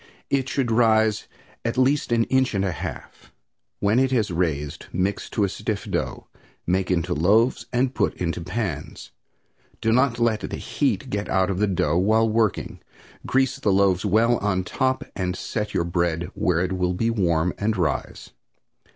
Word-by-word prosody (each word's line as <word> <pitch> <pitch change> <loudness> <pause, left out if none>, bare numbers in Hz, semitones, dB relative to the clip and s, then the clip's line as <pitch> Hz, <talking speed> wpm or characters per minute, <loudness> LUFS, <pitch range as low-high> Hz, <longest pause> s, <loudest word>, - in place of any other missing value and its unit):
It 135 -2 +1
should 130 -4 0
rise 110 -2 +3 0.4
at 115 +2 -2
least 130 +1 +2
an 115 -1 +3
inch 130 -2 +1
and 100 0 +1
a 95 - 0
half. - - -8 0.5
When 105 +4 +2
it 130 0 +3
has 110 -6 +1
raised 75 -5 -2
mix 95 +3 -1
to 105 - 0
a - - +3
stiff 105 +2 -4
dough, - - -3 0.4
make 90 +1 0
into 85 -3 0
loaves 105 - +2
and 125 +1 +1
put - - 0
into 85 -1 -3
pans. 85 - -5 0.7
Do 110 - +1
not 125 0 +3
let 115 -2 +2
the - - -5
heat - - -1
get 100 0 -2
out 95 +1 +2
of 95 - -3
the 105 - +2
dough 85 -3 +1
while 110 +4 +3
working. 110 -2 0 0.5
Grease 135 -1 +2
the 105 - +1
loaves 95 -2 +3
well 110 +4 +3
on 95 -2 0
top 130 +7 -1
and 90 -1 -2
set 105 +2 -4
your - - +2
bread 85 0 -1
where 85 -2 +1
it 95 +1 -1
will 90 -1 0
be 115 +5 0
warm 85 -5 +1
and 105 +1 0
rise. 85 -4 -2
100 Hz, 175 wpm, -24 LUFS, 90-115 Hz, 0.7 s, rise